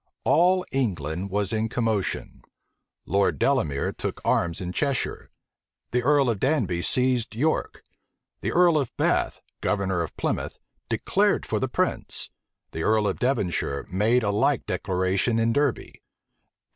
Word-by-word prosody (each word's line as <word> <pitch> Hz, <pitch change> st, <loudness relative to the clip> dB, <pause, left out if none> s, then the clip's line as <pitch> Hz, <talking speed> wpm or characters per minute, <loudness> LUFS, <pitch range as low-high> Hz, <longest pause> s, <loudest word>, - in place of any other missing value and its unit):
All 180 Hz, +3 st, +4 dB
England 95 Hz, -, -2 dB
was 100 Hz, 0 st, -1 dB
in 110 Hz, 0 st, 0 dB
commotion. 110 Hz, -4 st, -2 dB, 0.6 s
Lord 100 Hz, +4 st, +1 dB
Delamere 80 Hz, -, +1 dB
took -, -, -4 dB
arms 85 Hz, -1 st, +1 dB
in 90 Hz, -1 st, -4 dB
Cheshire, 140 Hz, +6 st, -2 dB, 0.6 s
the 125 Hz, -, +1 dB
earl 140 Hz, +1 st, +3 dB
of 105 Hz, -, -4 dB
Danby 120 Hz, -, +1 dB
seized 125 Hz, 0 st, +1 dB
York, 155 Hz, +7 st, -1 dB, 0.6 s
the -, -, -1 dB
earl 170 Hz, -3 st, +4 dB
of 135 Hz, -5 st, -2 dB
Bath, -, -, +1 dB, 0.2 s
governor 95 Hz, -3 st, 0 dB
of 85 Hz, -, -5 dB
Plymouth, -, -, -2 dB, 0.3 s
declared -, -, +1 dB
for -, -, -1 dB
the -, -, -1 dB
prince, -, -, -1 dB, 0.4 s
the 80 Hz, -, -4 dB
earl 110 Hz, +2 st, +2 dB
of 95 Hz, -, -2 dB
Devonshire 90 Hz, -, -1 dB
made 110 Hz, +6 st, +2 dB
a 100 Hz, -, +1 dB
like 110 Hz, +5 st, +1 dB
declaration 95 Hz, +4 st, 0 dB
in 115 Hz, 0 st, +2 dB
Derby. 145 Hz, -2 st, -1 dB
110 Hz, 135 wpm, -25 LUFS, 95-130 Hz, 0.6 s, All